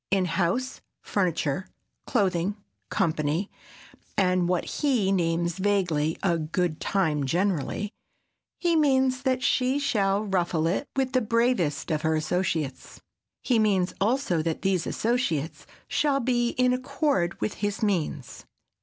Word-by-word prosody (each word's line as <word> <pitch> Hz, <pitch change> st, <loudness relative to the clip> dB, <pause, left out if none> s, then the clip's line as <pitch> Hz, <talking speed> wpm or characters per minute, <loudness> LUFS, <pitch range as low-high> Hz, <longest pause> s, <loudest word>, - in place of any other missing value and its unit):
In 195 Hz, -1 st, +2 dB
house, 190 Hz, +9 st, -1 dB, 0.2 s
furniture, 180 Hz, -3 st, -1 dB, 0.4 s
clothing, 195 Hz, -3 st, +1 dB, 0.3 s
company, 160 Hz, +4 st, 0 dB, 0.7 s
and 180 Hz, -2 st, +2 dB
what 180 Hz, -2 st, 0 dB
he 245 Hz, -10 st, +1 dB
names 170 Hz, -1 st, 0 dB
vaguely 180 Hz, -6 st, +1 dB
"a 170 Hz, -4 st, +2 dB
good 165 Hz, +1 st, -1 dB
time 160 Hz, -7 st, +1 dB
generally," 185 Hz, +3 st, -1 dB, 0.7 s
he 345 Hz, -1 st, +1 dB
means 265 Hz, -4 st, +3 dB
that 260 Hz, -2 st, 0 dB
she 255 Hz, +2 st, +2 dB
shall 205 Hz, -7 st, +1 dB
ruffle 175 Hz, -4 st, 0 dB
it 185 Hz, -, 0 dB
with 265 Hz, -1 st, 0 dB
the 255 Hz, -, +3 dB
bravest 230 Hz, -, +1 dB
of 155 Hz, -1 st, 0 dB
her 160 Hz, 0 st, +1 dB
associates. 155 Hz, -3 st, -2 dB, 0.4 s
He 245 Hz, -4 st, +2 dB
means 195 Hz, -4 st, +2 dB
also 215 Hz, -, +1 dB
that 165 Hz, +2 st, -3 dB
these 190 Hz, -4 st, +1 dB
associates 185 Hz, -, -1 dB, 0.2 s
shall 285 Hz, -2 st, +1 dB
be 240 Hz, -1 st, +1 dB
in 250 Hz, 0 st, +3 dB
accord 255 Hz, -, 0 dB
with 215 Hz, -, -1 dB
his 205 Hz, +1 st, -1 dB
means. 165 Hz, -, -2 dB
195 Hz, 125 wpm, -26 LUFS, 170-245 Hz, 0.7 s, means